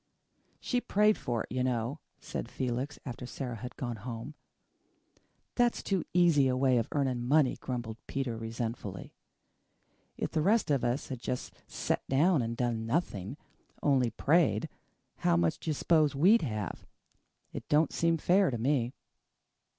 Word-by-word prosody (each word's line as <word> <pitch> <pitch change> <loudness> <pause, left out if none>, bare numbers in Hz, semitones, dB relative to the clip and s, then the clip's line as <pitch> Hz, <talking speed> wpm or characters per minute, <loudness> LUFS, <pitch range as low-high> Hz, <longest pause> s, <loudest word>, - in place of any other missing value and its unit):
"She 245 -1 -1
prayed 210 0 +3
for 120 -2 -2
it, - - -13
you 125 +1 0
know," 125 +3 -1 0.2
said - - -5
Felix, 130 +3 -3
after 125 -1 -6
Sara 125 -3 -5
had 125 +3 -7
gone 120 -3 -4
home. 115 +6 -6 1.2
"That's 240 -1 +1
too 195 -4 0
easy 170 -6 +4
a 130 0 +1
way 130 -2 +3
of 115 - -2
earning 130 -4 0
money," 140 +1 +3
grumbled 120 -4 -5
Peter 135 -4 -2
resentfully. 115 -4 -5 1.0
"If - - -2
the 160 - +1
rest 205 0 +3
of 140 -3 +2
us 120 +4 -1
had 130 -3 -4
just 125 0 -4
set - - -1
down 150 +3 +3
and 115 0 -3
done 115 -2 -1
nothing, 120 - -2 0.5
only 130 -4 +3
prayed, 135 - +2 0.5
how 85 -1 +2
much 85 -1 +1
do - - -5
you - - +2
s'pose 155 -2 +3
we'd 190 +11 +5
have? 110 - -4 0.7
It - - -7
don't 150 0 +3
seem 165 0 +2
fair 185 +4 +3
to 120 - -2
me." 125 0 0
130 Hz, 155 wpm, -30 LUFS, 115-155 Hz, 1.2 s, we'd